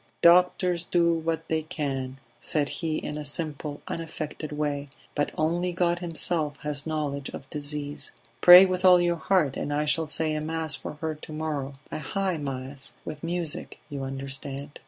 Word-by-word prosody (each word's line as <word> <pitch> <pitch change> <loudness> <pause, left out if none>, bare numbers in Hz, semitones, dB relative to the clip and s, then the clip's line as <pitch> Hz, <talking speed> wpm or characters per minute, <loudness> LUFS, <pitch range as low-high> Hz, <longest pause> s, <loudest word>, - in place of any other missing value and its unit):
"Doctors 180 0 +5
do 170 -1 +3
what 165 0 -2
they 160 0 0
can," 135 -5 -3 0.2
said 145 -2 0
he 160 -2 -2
in 150 - -4
a - - -4
simple 145 -1 -4
unaffected 155 -2 -5
way, 145 -1 -2 0.3
"but 145 - 0
only 170 +3 +1
God 175 0 +1
Himself 165 -3 +1
has 150 0 0
knowledge 145 -3 -2
of 135 - -8
disease. 145 -1 -4 0.3
Pray 180 +2 +11
with 185 -1 -1
all 180 -1 +8
your 175 -1 +2
heart, 165 -6 +2
and 145 - -3
I 150 +1 +1
shall 155 +1 +1
say 155 +1 0
a 155 - -1
mass 160 0 0
for 140 - -3
her 160 -1 -1
to 155 +1 -11
morrow 150 -3 -3 0.2
a - - -3
high 190 +3 -1
mass 135 -1 -5
with 150 -1 -6
music, 170 -2 -3
you 140 -1 -4
understand." 135 +1 -5
155 Hz, 170 wpm, -27 LUFS, 145-170 Hz, 0.3 s, Pray